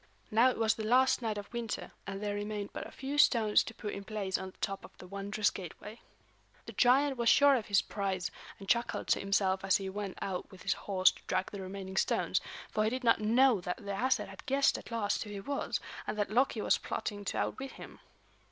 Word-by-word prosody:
Now 230 +4 +5
it - - -3
was 225 -1 +3
the 220 - -5
last 255 +4 +4
night 220 -3 -2
of 205 +3 -8
winter, 235 -2 -4 0.2
and 195 +1 -5
there 205 -1 -1
remained 205 0 -4
but - - -5
a - - -13
few 275 +2 -3
stones 220 -6 +5
to 225 - -7
put 210 -2 -5
in 200 - -6
place 200 -2 -3
on 190 - -2
the - - -19
top 195 -2 -3
of - - -14
the - - -11
wondrous 200 +2 -1
gateway. 205 +4 -9 0.6
The - - -7
giant 270 +2 +4
was 235 -1 +3
sure 285 -1 +6
of 230 -5 -2
his 200 -1 +3
prize, 190 -3 -2 0.3
and 195 - -11
chuckled 235 +3 +1
to - - +4
himself 195 -1 +1
as 195 -1 +4
he 195 -1 -5
went 200 -1 -5
out 185 -2 -4
with 190 - -13
his - - +2
horse 190 -2 +3
to - - -16
drag 185 0 -1
the 200 - -6
remaining 190 0 -6
stones; - - +1 0.3
for 215 - +1
he 215 - +2
did 255 +2 -3
not 230 -2 +4
know 235 0 +4
that 180 0 -3
the 200 -2 -6
Æsir 245 +7 +1
had - - -11
guessed 275 +1 +3
at - - -12
last 220 -3 -1
who 210 - -10
he 205 -1 -5
was, 280 +8 -2 0.3
and - - -3
that 205 -1 -1
Loki 245 -1 +2
was - - +3
plotting 205 -1 -4
to - - -2
outwit 270 0 -3
him. - - -11
210 Hz, 235 wpm, -32 LUFS, 195-235 Hz, 0.6 s, sure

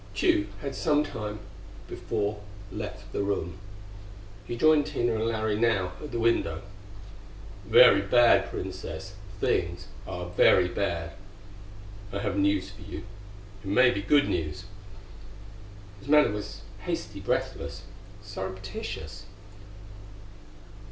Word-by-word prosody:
Tugh 100 0 +3 0.2
had 140 -1 -3
some 150 +1 +2
time 105 -6 -5 0.5
before 105 0 -3 0.3
left 105 +1 -7
the - - 0
room. 95 -3 -2 0.9
He 120 - -4
joined 155 +1 +5
Tina 120 -6 0
and 110 0 -1
Larry 110 -2 0
now 100 -6 +2
at 150 - -6
the 120 - -2
window. 115 -8 +1 1.0
"Very 125 - +8
bad, 120 +4 +5
Princess; 95 +5 -6 0.3
things 85 -2 0 0.2
are 90 0 -5
very 90 0 +5
bad.... 85 -3 -2 1.0
I 100 - -3
have 100 -1 -2
news 100 -1 +1
for 100 +2 -15
you. 100 - -7 0.6
It - - -9
may 125 +5 +5
be 100 - -2
good 145 +8 +4
news." 80 +5 -2 1.3
His 100 - -14
manner 150 -3 +5
was 105 0 -6 0.2
hasty, - - -4
breathless, 70 0 -2 0.4
surreptitious. 95 -3 -6
100 Hz, 115 wpm, -28 LUFS, 95-115 Hz, 1.3 s, Very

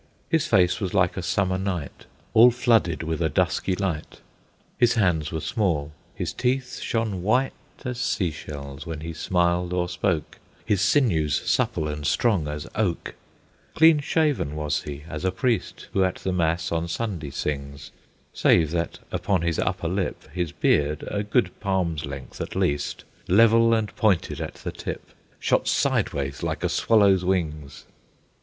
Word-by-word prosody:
His 165 0 +2
face 90 -4 +3
was 95 -2 -3
like 90 -3 +3
a 95 - -3
summer 95 0 0
night, 90 -6 -4 0.3
All 115 +3 +8
flooded 115 -10 +2
with 80 0 -2
a 80 - +2
dusky 90 +5 +1
light; 90 -6 -3 0.6
His 120 -1 +4
hands 85 -9 +1
were 80 -1 -3
small; 80 -9 -1 0.2
his - - -3
teeth 125 0 -1
shone 110 -5 -1
white 125 +8 +2 0.3
As 125 -1 -3
sea 110 -9 0
shells, 70 -1 -8
when 80 -2 -5
he 80 +1 -5
smiled 90 +2 0
or 90 -1 0
spoke; 90 -2 -2 0.3
His 100 -3 +1
sinews 95 - +2
supple 75 - +1
and 75 -1 -3
strong 100 -5 +2
as 75 0 -4
oak; 100 -6 -1 0.6
Clean 160 -1 +6
shaven 145 - 0
was 75 -1 -1
he 75 0 -7
as 75 -3 -6
a 95 - +2
priest, 115 +2 -1
Who 95 - +3
at 95 - 0
the 95 - -3
mass 85 -1 0
on 85 0 -1
Sunday 85 -5 -3
sings, 70 0 -4 0.4
Save 80 -3 +3
that 85 0 -2
upon 95 -4 0
his 85 -2 0
upper - - -1
lip - - -2
His 90 -3 -2
beard, 75 +1 +1
a 100 - -1
good 105 +4 +1
palm's 90 -7 -1
length 70 -2 -8
at - - -5
least, 70 0 -1 0.2
Level 115 +4 +5
and 110 -2 -2
pointed 105 -7 +1
at - - -5
the - - -6
tip, - - -7 0.3
Shot - - +1
sideways, 70 -1 0
like - - -3
a - - +1
swallow's 100 -5 +4
wings. 75 -7 -2
90 Hz, 160 wpm, -25 LUFS, 75-105 Hz, 0.6 s, All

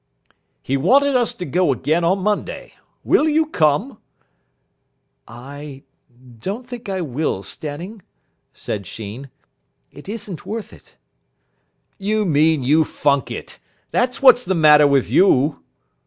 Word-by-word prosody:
"He 135 - -1
wanted 270 - +3
us 240 -3 +2
to 180 - -6
go 175 +2 +1
again 155 +6 0
on 185 +3 +1
Monday. 210 - -3 0.3
Will 310 - +3
you 315 +1 +2
come?" 205 - 0 1.3
"I 135 +3 -10 0.6
don't 205 - -5
think 245 -4 -8
I 190 -1 -2
will, 145 - -2
Stanning," 170 - -7 0.5
said 100 -4 -6
Sheen. 110 +6 -8 0.6
"It 145 - -13
isn't 205 -5 -7
worth 220 0 -6
it." - - -19 1.0
"You 210 +2 0
mean 155 -3 +2
you 150 +5 +4
funk 140 -3 0
it. - - -8 0.3
That's 250 +2 -1
what's 255 -2 +7
the 190 - -1
matter 150 -2 +6
with 140 -2 +2
you." 145 -6 +3
165 Hz, 125 wpm, -20 LUFS, 140-215 Hz, 1.3 s, what's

